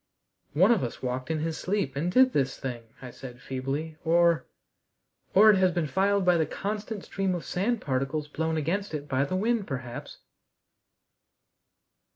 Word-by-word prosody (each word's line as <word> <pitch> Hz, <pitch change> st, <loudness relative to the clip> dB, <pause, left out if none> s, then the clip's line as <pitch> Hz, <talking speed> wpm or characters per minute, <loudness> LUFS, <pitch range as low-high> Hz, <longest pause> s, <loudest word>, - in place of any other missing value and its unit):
"One 185 Hz, +9 st, +5 dB
of 225 Hz, -, +3 dB
us 120 Hz, -, -5 dB
walked 130 Hz, +2 st, -3 dB
in 160 Hz, -1 st, -1 dB
his 160 Hz, 0 st, -2 dB
sleep 185 Hz, -8 st, -1 dB
and 165 Hz, +6 st, -1 dB
did 255 Hz, +4 st, +5 dB
this 135 Hz, -2 st, 0 dB
thing," 120 Hz, -3 st, -5 dB, 0.2 s
I 125 Hz, -, -7 dB
said 125 Hz, -1 st, -10 dB
feebly, 135 Hz, +5 st, -4 dB
"or 170 Hz, 0 st, +3 dB, 0.9 s
or 215 Hz, +3 st, +8 dB
it 200 Hz, -, +3 dB
has 185 Hz, -1 st, +4 dB
been 170 Hz, -2 st, 0 dB
filed 195 Hz, +4 st, +1 dB
by 180 Hz, -1 st, +5 dB
the 160 Hz, -2 st, +1 dB
constant 210 Hz, +3 st, -4 dB
stream 195 Hz, -2 st, -1 dB
of 175 Hz, -, -5 dB
sand 210 Hz, +5 st, -1 dB
particles 135 Hz, +3 st, -1 dB
blown 160 Hz, +2 st, -2 dB
against 170 Hz, +4 st, -1 dB
it 145 Hz, -1 st, -5 dB
by 135 Hz, 0 st, +1 dB
the 185 Hz, -, -3 dB
wind, 220 Hz, +1 st, 0 dB
perhaps." 125 Hz, -3 st, -6 dB
160 Hz, 170 wpm, -27 LUFS, 135-195 Hz, 0.9 s, or